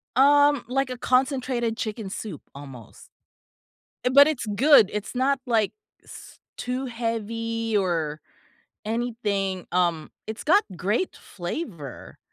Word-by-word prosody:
Um, 285 Hz, +1 st, +5 dB
like 270 Hz, +1 st, 0 dB
a 255 Hz, -, -5 dB
concentrated 255 Hz, -3 st, 0 dB
chicken 215 Hz, -2 st, -4 dB
soup 190 Hz, -4 st, -6 dB
almost. 135 Hz, -6 st, -12 dB, 1.0 s
Uh, -, -, +4 dB
but 280 Hz, +2 st, +8 dB
it's 300 Hz, -6 st, -2 dB
good, 265 Hz, -4 st, +6 dB
it's 210 Hz, 0 st, -4 dB
not 270 Hz, +2 st, +2 dB
like 225 Hz, -4 st, +2 dB, 0.3 s
s -, -, -13 dB, 0.2 s
too 250 Hz, +2 st, -3 dB
heavy 230 Hz, -1 st, -3 dB
or 165 Hz, -6 st, -1 dB, 0.7 s
anything, 210 Hz, -5 st, -2 dB
um, 170 Hz, -3 st, +1 dB, 0.2 s
it's 220 Hz, +1 st, -6 dB
got 390 Hz, +7 st, +5 dB
great 210 Hz, -, -1 dB
flavor, 175 Hz, -, -7 dB
230 Hz, 115 wpm, -25 LUFS, 195-255 Hz, 1.0 s, but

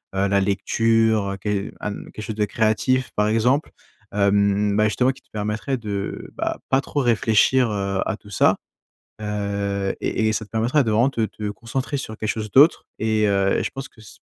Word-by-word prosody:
heu, 95 Hz, +1 st, +2 dB
la 100 Hz, 0 st, +3 dB
lecture, 110 Hz, +1 st, +2 dB
heu, -, -, -6 dB
que 100 Hz, +1 st, -2 dB
à, 105 Hz, -, -3 dB
mmh, -, -, -9 dB
quelque 110 Hz, -, -7 dB
chose 110 Hz, -, -5 dB
de 105 Hz, -1 st, +1 dB
créatif, 110 Hz, +5 st, +1 dB
par 105 Hz, 0 st, +2 dB
exemple. 120 Hz, +7 st, +2 dB, 0.4 s
Hem, 100 Hz, 0 st, +2 dB
bah, 105 Hz, -, +4 dB
justement 125 Hz, +4 st, +2 dB
qui 135 Hz, -, -15 dB
te -, -, -36 dB
permettrait 105 Hz, +5 st, -2 dB
de, 100 Hz, -4 st, -5 dB
bah, -, -, -2 dB
pas 130 Hz, -, +4 dB
trop 145 Hz, -, -2 dB
réfléchir, 120 Hz, +1 st, +3 dB
heu, 100 Hz, -1 st, -1 dB
à 110 Hz, -, -1 dB
tout 105 Hz, -, -17 dB
ça. -, -, +4 dB, 0.7 s
Heu 100 Hz, -1 st, -2 dB
et 110 Hz, -, 0 dB
et -, -, +2 dB
ça 110 Hz, +1 st, -2 dB
te 105 Hz, -, -22 dB
permettra 120 Hz, +6 st, +2 dB
de 115 Hz, -, 0 dB
vraiment 115 Hz, +5 st, +4 dB
de 115 Hz, -5 st, -1 dB
te 105 Hz, -, -19 dB
te -, -, -2 dB
concentrer 125 Hz, +6 st, -4 dB
sur 110 Hz, -5 st, -5 dB
quelque 110 Hz, -, -3 dB
chose 110 Hz, -1 st, -4 dB
d'autre 145 Hz, +5 st, +5 dB
et 110 Hz, -1 st, +2 dB
heu 100 Hz, -1 st, +2 dB
et -, -, -1 dB
je -, -, -2 dB
pense 135 Hz, 0 st, -6 dB
que -, -, -21 dB
ç 110 Hz, -, -14 dB
110 Hz, 215 wpm, -22 LUFS, 100-115 Hz, 0.7 s, d'autre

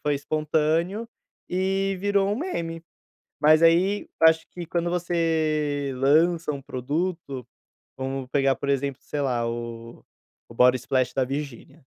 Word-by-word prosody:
foi 145 Hz, -1 st, 0 dB
espontâneo, 155 Hz, +8 st, 0 dB, 0.4 s
e 195 Hz, +1 st, 0 dB
virou 200 Hz, 0 st, +1 dB
um -, -, -1 dB
meme. 170 Hz, -, -4 dB, 0.6 s
Mas 155 Hz, +2 st, +5 dB
aí, 180 Hz, +5 st, +3 dB
acho 160 Hz, 0 st, +5 dB
que, 175 Hz, -2 st, -7 dB
quando 170 Hz, 0 st, -1 dB
você 155 Hz, -5 st, 0 dB
lança 160 Hz, +5 st, +3 dB
um 140 Hz, -, -5 dB
produto, 140 Hz, 0 st, -3 dB, 0.5 s
vamos 135 Hz, -1 st, -4 dB
pegar 135 Hz, -1 st, +2 dB
por 140 Hz, -, -6 dB
exemplo, 140 Hz, -1 st, -1 dB
sei 145 Hz, -, -4 dB
lá, 125 Hz, -4 st, 0 dB
o 115 Hz, 0 st, -7 dB, 0.5 s
Body 125 Hz, +2 st, +5 dB
Splash 130 Hz, 0 st, 0 dB
da 130 Hz, -, +2 dB
Virgínia. 140 Hz, +1 st, -6 dB
155 Hz, 130 wpm, -25 LUFS, 135-170 Hz, 0.6 s, Mas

